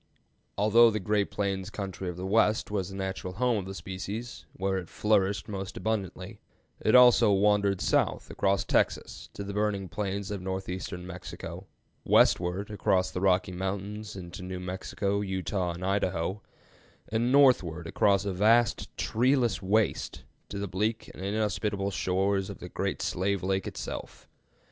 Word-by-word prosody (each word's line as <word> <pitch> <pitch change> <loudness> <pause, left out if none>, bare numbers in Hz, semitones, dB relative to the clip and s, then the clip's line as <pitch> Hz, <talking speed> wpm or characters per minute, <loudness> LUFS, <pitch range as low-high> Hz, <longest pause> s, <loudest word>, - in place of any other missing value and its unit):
Although 115 +3 +6
the 110 -1 -1
great 105 +1 0
plains 100 -1 -2
country 95 -3 -5
of 90 - -6
the 90 - -5
West 105 +1 +2
was 95 -3 -1
the 95 - -8
natural 95 -1 -4
home 120 +1 +1
of 95 - -6
the 95 - -6
species, 100 +6 -6
where 95 0 -1
it 90 - -9
flourished 100 -2 +1
most 95 -2 -5
abundantly, 100 -1 -3 0.4
it 110 - +3
also 120 -3 +7
wandered 100 -1 +3
south - - +1
across 100 -1 +1
Texas - - 0
to 100 - -5
the 100 0 -5
burning 105 -2 0
plains 100 +2 -3
of 100 -2 -4
northeastern 95 -1 -4
Mexico, 90 0 -8 0.4
westward 90 +4 +3
across 95 -3 +1
the 90 - -4
Rocky 95 -1 +2
Mountains 100 +3 -4
into 90 -2 -8
New 90 0 -5
Mexico, 100 +2 -2
Utah, 95 -2 -2
and 90 +2 -6
Idaho, 95 0 -1 0.7
and 115 +3 +1
northward 125 - +4
across 100 +4 +2
a 100 - -1
vast 115 +5 +3
treeless 125 -1 +2
waste 105 +3 0 0.3
to 100 - -5
the 100 0 -3
bleak 105 +5 -2
and 95 - -9
inhospitable 100 -1 -1
shores 95 +1 0
of - - -7
the - - -9
Great - - -2
Slave 100 +1 -1
Lake 95 0 0
itself. - - -7
100 Hz, 155 wpm, -28 LUFS, 95-105 Hz, 0.7 s, also